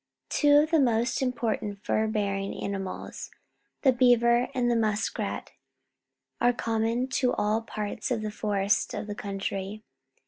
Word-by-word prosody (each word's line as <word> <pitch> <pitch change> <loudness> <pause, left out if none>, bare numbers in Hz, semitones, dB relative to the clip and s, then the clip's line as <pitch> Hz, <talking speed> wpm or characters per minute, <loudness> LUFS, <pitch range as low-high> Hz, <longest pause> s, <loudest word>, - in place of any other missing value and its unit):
Two 290 -1 +4
of 305 +2 +3
the 325 - +5
most 240 -2 +2
im 255 -1 +1
portant 220 -4 -2
fur 220 0 +1
bearing 200 -2 -1
animals, 195 -2 -5 0.5
the 265 - +6
beaver 240 -1 +4
and 240 -2 +2
the - - +2
musk 215 -2 0
rat, - - -3 0.9
are 245 +1 +4
com 225 -2 -1
mon 235 +3 0
to 255 -1 +1
all 215 +2 +1
parts 210 -1 -4
of 230 -4 -1
the 215 - -3
forests 205 -1 0
of - - -4
the 210 - -5
country. 200 +1 -4
220 Hz, 160 wpm, -27 LUFS, 205-245 Hz, 0.9 s, the